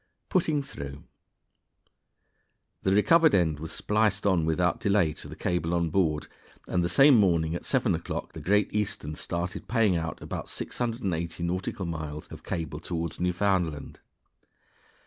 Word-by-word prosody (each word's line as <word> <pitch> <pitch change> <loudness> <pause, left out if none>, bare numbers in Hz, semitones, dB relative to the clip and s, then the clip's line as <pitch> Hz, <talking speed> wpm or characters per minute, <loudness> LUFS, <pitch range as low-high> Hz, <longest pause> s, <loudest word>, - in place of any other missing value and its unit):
"Putting 155 -6 +1
Through." 70 - -8 1.8
The 95 - +1
recovered 160 +10 +5
end 80 -5 +2
was 80 +1 -6
spliced 105 -1 +1
on 90 -5 +3
without 85 +2 +1
delay 100 -6 +2
to - - -7
the - - -9
cable 85 -1 -1
on 85 -2 0
board, 80 -4 +1 0.4
and 90 - +1
the 85 - 0
same 135 +8 +7
morning 85 -7 +3
at 85 - -5
seven - - +2
o'clock - - -4
the - - -7
Great 105 +1 +2
Eastern 100 -7 -2
started 85 +3 -4
paying 110 -5 +3
out 80 -1 -3
about - - -6
680 95 -9 -3
nautical 90 +2 -2
miles 80 -3 -5
of - - -10
cable 80 -3 -4
toward 85 -1 -4
Newfoundland. 90 -4 0
90 Hz, 145 wpm, -28 LUFS, 80-100 Hz, 1.8 s, same